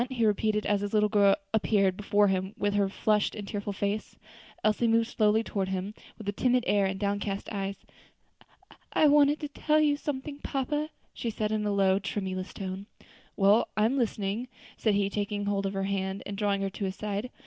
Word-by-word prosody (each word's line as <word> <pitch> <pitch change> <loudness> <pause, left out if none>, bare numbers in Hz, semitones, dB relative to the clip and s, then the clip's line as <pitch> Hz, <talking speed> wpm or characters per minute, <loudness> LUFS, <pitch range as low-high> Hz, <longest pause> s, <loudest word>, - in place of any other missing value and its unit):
he 240 -4 0
repeated, 210 0 +1
as 205 -1 +1
his 205 +1 -2
little 210 0 +4
girl 200 -2 +5 0.2
appeared 200 -3 +2
before 205 +1 +2
him 190 +1 -1
with 205 0 0
her 200 -1 +2
flushed 210 +1 +1
and 205 -2 -6
tearful 205 0 -3
face. 200 +2 -3 0.5
Elsie 215 +2 +2
moved 230 0 +3
slowly 215 0 +3
toward 195 -4 -2
him, 190 +2 -3 0.2
with 215 - -10
a - - +1
timid 250 +4 +2
air 200 -2 +3
and 190 0 -3
downcast 200 0 -2
eyes. 195 -1 -3 1.2
"I - - +4
wanted 290 0 +5
to 300 - -2
tell 305 +1 +1
you 295 -1 +3
something, 285 0 -5
papa," 295 +3 -2 0.2
she 235 - -3
said 215 -1 -2
in 215 -1 0
a - - +1
low, 195 -1 +3
tremulous 190 -2 -4
tone. 190 +1 -6 0.5
"Well, 205 +3 +4
I 215 - +4
am 240 +5 +2
listening," 220 -2 -1 0.3
said 215 -3 +1
he, 200 -1 +2
taking 205 0 -2
hold 200 -1 0
of 195 - -4
her 195 0 -1
hand 195 0 -2
and 200 - -5
drawing 200 -1 0
her 195 - -2
to 200 - -4
his 190 0 -3
side. 210 +3 -3
205 Hz, 200 wpm, -28 LUFS, 195-225 Hz, 1.2 s, girl